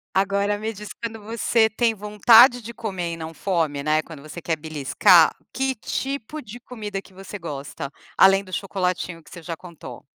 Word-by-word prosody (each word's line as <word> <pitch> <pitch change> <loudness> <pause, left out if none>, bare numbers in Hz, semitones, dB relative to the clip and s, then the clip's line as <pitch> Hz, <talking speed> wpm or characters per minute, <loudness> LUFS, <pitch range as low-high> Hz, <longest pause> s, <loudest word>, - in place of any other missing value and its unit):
Agora 200 +1 +1
me 220 +1 -4
diz 210 +1 -9
quando 225 -2 -7
você 225 +1 +1
tem 230 0 +1
vontade 220 +4 +6
de 235 0 -9
comer 180 -6 -4
e - - -8
não 160 0 -7
fome, 160 -5 -1
né, 155 +1 +2
quando 160 -4 -11
você 155 +3 -9
quer 165 -2 -1
beliscar, 160 +3 +4 0.2
que 265 0 -1
tipo 275 +5 -4
de 230 +4 -10
comida 215 -5 -6
que 195 -1 -20
você 195 +2 -8
gosta? 140 -4 -6 0.3
Além 195 +1 +6
do 185 - -14
chocolatinho 180 -3 -2
que - - -19
você 170 - -10
já 165 -1 -5
contou. 170 -2 -11
195 Hz, 185 wpm, -23 LUFS, 165-220 Hz, 0.3 s, vontade